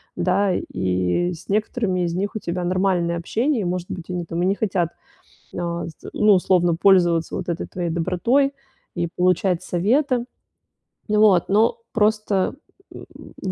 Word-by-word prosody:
да, 190 +2 +1
и 95 - -1
с 170 +1 -13
некоторыми 210 -2 0
из 170 - -2
них 200 +4 -2
у - - -2
тебя 180 -1 -3
нормальное 180 -2 +1
общение, 230 - 0
и, - - -2
может 180 0 -3
быть, 175 0 -6
они 175 -1 -3
там 165 +1 -3
и - - +2
не 190 - +3
хотят, 190 -6 0 0.6
э, 170 -1 -3 0.3
ну, 210 0 +4
условно, 175 -2 +2
пользоваться 175 -3 +3
вот 185 - -4
этой 170 -1 -2
твоей 175 -2 -4
добротой 185 +12 +1 0.4
и 170 -1 -1
получать 180 0 +2
советы. 240 - +1 0.9
Вот, 210 -4 +4
но 215 +3 +3
просто, 210 -3 +1 0.4
м, - - -10 0.4
в - - -3
180 Hz, 150 wpm, -22 LUFS, 170-205 Hz, 0.9 s, ну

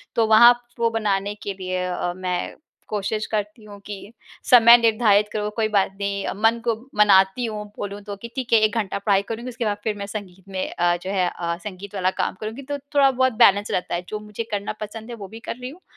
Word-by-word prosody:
तो 225 -1 +3
वहाँ 235 +2 +8
प 240 0 -18
वो 230 0 +3
बनाने 205 -2 -1
के 200 - -3
लिए 185 -1 -3
अ, 180 -1 -2
मैं 180 -1 -3 0.4
कोशिश 215 +1 -2
करती 210 +1 -3
हूँ 205 -1 -11
कि 205 +1 -9 0.4
समय 235 -1 +9
निर्धारित 215 -3 +3
करूँ 210 -1 -2
कोई 225 -2 +1
बात 200 -2 +2
नहीं, 200 0 -2 0.2
मन 230 +1 +4
को 230 -2 +2 0.2
मनाती 195 +3 +5
हूँ 210 -2 -5
बोलूँ 205 0 -5
तो 205 0 -6
कि 235 - -6
ठीक 255 -3 -3
है 225 - +7
1 215 - -1
घंटा 200 -3 -2
पढ़ाई 200 -1 +2
करूँगी 235 +3 -5
उसके 235 -1 -4
बाद 205 -1 0
फिर 215 -2 0
मैं 200 - -5
संगीत 195 -3 -8
में 190 -1 -3
अ, 175 0 +2
जो 185 - -5
है 185 -3 +1
अ, 170 -1 -3
संगीत 200 0 -8
वाला 185 -1 +1
काम - - -2
करूँगी 220 +5 -5
तो 285 +1 -4 0.2
थोड़ा 275 -1 +6
बहुत 260 -1 +1
बैलेंस 205 -2 +4
रहता 180 - -1
है, 175 +1 -4
जो 215 - -4
मुझे 210 +1 -6
करना 205 0 -2
पसंद 220 +2 -7
है 240 - -6
वो 200 -4 -9
भी 225 +4 -11
कर 230 - -6
रही 250 0 -6
हूँ, 325 +7 -14
210 Hz, 235 wpm, -23 LUFS, 195-230 Hz, 0.4 s, समय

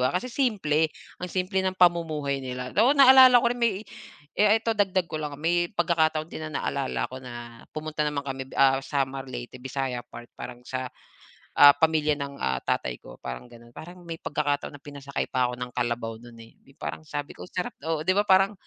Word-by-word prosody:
Kasi 185 - -3
simple 175 - +1 0.3
ang 180 - -4
simple 185 +2 -1
ng 185 0 -1
pamumuhay 155 -6 +2
nila, 125 -1 -5
oo 260 +6 +5
naalala 260 -2 +9
ko 240 - +4
rin 245 - -8
may, 220 -3 +1 0.6
eh, 210 +1 +6
ito 225 0 0
dagdag 190 -4 +1
ko 155 -2 -5
lang 145 -1 -5
may 175 +3 +1
pagkakataon 160 -4 +1
din - - -6
na 155 - -3
naalala 140 -1 -1
ko 130 - -7
na 120 -2 -9 0.2
pumunta 155 0 -4
naman 145 -1 -3
kami, 135 -1 -5
ah, 135 0 +4
Samar 135 -1 -2
Leyte 120 0 -7
bisaya 135 -1 -3
part 120 0 -12
parang 125 0 -9
sa, 130 0 -4 0.7
ah, 145 0 +10
pamilya 155 0 +2
ng, 140 0 -5
ah, 65 - -1
tatay 60 -1 -2
ko - - -12
parang 65 - -6
gano'n. 120 0 -16
Parang 175 +7 -11
may 165 -1 -6
pagkakataon 145 -1 -2
na 140 - -20
pinasakay 140 -1 -4
pa 125 -1 +1
ako 125 - -5
ng 125 0 -5
kalabaw 120 -2 -2
no'n, 120 -1 -14
eh, 115 - -16 0.2
parang - - -5
sabi 145 -1 -5
ko, - - -11
"Sarap," 180 -1 -3
oo 160 -1 -1
di 185 - +3
ba, 205 +2 +2
parang 195 +2 +5
145 Hz, 195 wpm, -26 LUFS, 130-180 Hz, 0.7 s, ah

